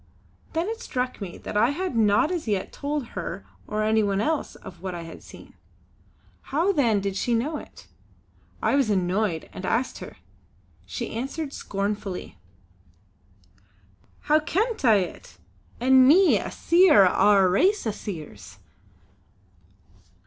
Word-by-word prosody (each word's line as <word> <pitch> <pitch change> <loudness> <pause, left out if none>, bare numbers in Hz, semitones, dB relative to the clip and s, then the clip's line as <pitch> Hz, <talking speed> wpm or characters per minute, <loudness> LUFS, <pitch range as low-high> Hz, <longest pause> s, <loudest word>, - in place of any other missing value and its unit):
Then 330 +3 -1
it 450 +1 -5
struck 250 -2 -3
me 185 -3 -6
that - - -8
I 220 +4 +4
had 340 0 -3
not 215 - +3
as 340 -8 -3
yet 200 -3 -2
told 285 -3 -3
her - - -6 0.2
or 215 0 -2
any 220 +1 +2
one 200 -2 0
else 305 +7 -1
of 175 -2 -12
what 185 -2 -5
I 170 - -6
had 165 - -11
seen. - - -14 0.9
How 330 +8 0
then 235 - +2
did 195 -1 -3
she 235 +4 0
know 290 +7 -1
it? - - -13 0.8
I - - +2
was 275 -5 +2
annoyed 185 -2 0
and 185 - -8
asked 235 +7 -1
her. - - -10 0.7
She 235 - -5
answered 275 +5 -4
scornfully: 200 -1 -4 1.8
"How 305 +1 +3
kent 420 - -1
I 225 -4 +6
it, 185 -3 -4 0.4
an' 260 +1 +5
me 360 +6 +5
a - - -5
Seer 335 - +5
o' 205 +3 +3
a 190 -1 +5
race 375 - +2
o' 220 - 0
Seers! 155 - -9
230 Hz, 145 wpm, -25 LUFS, 200-300 Hz, 1.8 s, I